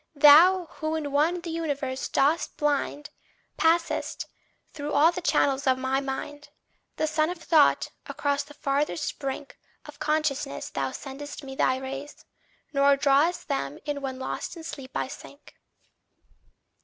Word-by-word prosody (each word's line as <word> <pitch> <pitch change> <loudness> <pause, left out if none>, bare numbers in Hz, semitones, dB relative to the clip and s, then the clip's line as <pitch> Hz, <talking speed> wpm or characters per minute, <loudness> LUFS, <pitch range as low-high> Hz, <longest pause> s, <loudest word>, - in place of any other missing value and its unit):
Thou 325 +6 +7
who 315 0 -1
in 295 -3 -3
one 320 +5 +2
the 340 -1 -6
universe 285 -5 -2
dost 295 +5 +1
bind, 295 0 -1 0.5
Passest 335 +1 +1 0.5
through 295 -1 -5
all 310 +4 +5
the 360 - -5
channels 275 -5 +1
of 260 -1 +4
my 260 +1 0
mind; 290 +2 -6 0.5
The - - 0
sun 310 +1 +1
of 360 - -4
thought, 320 -2 +3 0.2
across 285 -1 -1
the 290 +1 -12
farthest 295 +2 -1
brink 275 0 -5 0.3
Of - - -12
consciousness 300 - -1
thou 135 -1 -1
sendest 285 - -8
me 270 -1 -8
thy 255 -1 +2
rays; 270 +2 -7 0.5
Nor 280 0 +4
drawest 285 +5 +2
them 140 +1 -2
in 290 -1 -3
when 265 -1 -4
lost 260 +6 -5
in 330 - -9
sleep 275 -5 -7
I - - -1
sink. 285 +1 -12
285 Hz, 145 wpm, -26 LUFS, 270-310 Hz, 0.5 s, Thou